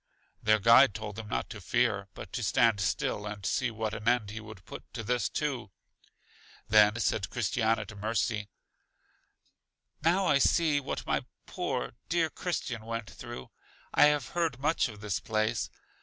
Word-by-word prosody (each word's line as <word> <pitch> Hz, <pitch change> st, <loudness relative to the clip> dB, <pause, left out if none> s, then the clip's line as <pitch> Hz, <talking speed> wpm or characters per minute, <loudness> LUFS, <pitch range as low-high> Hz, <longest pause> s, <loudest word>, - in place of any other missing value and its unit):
Their 110 Hz, 0 st, +4 dB
guide 115 Hz, +3 st, +6 dB
told 105 Hz, -2 st, -5 dB
them 110 Hz, 0 st, -7 dB
not -, -, -2 dB
to 105 Hz, -, -8 dB
fear, 110 Hz, -2 st, +1 dB
but -, -, -9 dB
to -, -, -2 dB
stand 115 Hz, -3 st, +3 dB
still, 105 Hz, +4 st, -1 dB
and 105 Hz, -2 st, -6 dB
see 125 Hz, +4 st, +1 dB
what 110 Hz, -1 st, -3 dB
an 110 Hz, 0 st, -6 dB
end 120 Hz, -4 st, +2 dB
he 110 Hz, -, -5 dB
would 110 Hz, -3 st, -11 dB
put -, -, -10 dB
to 115 Hz, -, -4 dB
this 120 Hz, +3 st, 0 dB
too. 140 Hz, -8 st, -2 dB, 1.0 s
Then 105 Hz, 0 st, +6 dB
said 95 Hz, -2 st, 0 dB
Christiana 115 Hz, -2 st, 0 dB
to 105 Hz, +1 st, -11 dB
Mercy: 105 Hz, 0 st, -1 dB, 1.5 s
Now 180 Hz, +4 st, +3 dB
I 145 Hz, -5 st, +4 dB
see 155 Hz, -1 st, +3 dB
what 140 Hz, -, -4 dB
my -, -, 0 dB, 0.2 s
poor 60 Hz, -, -3 dB, 0.2 s
dear 165 Hz, -1 st, +1 dB
Christian 135 Hz, -10 st, -3 dB
went 115 Hz, -1 st, -5 dB
through; 65 Hz, -, -9 dB, 0.4 s
I -, -, +7 dB
have 150 Hz, -2 st, +2 dB
heard 165 Hz, -6 st, -1 dB
much 140 Hz, 0 st, +1 dB
of 105 Hz, -2 st, -11 dB
this 105 Hz, -2 st, -1 dB
place. 110 Hz, +1 st, -1 dB
110 Hz, 165 wpm, -30 LUFS, 105-130 Hz, 1.5 s, I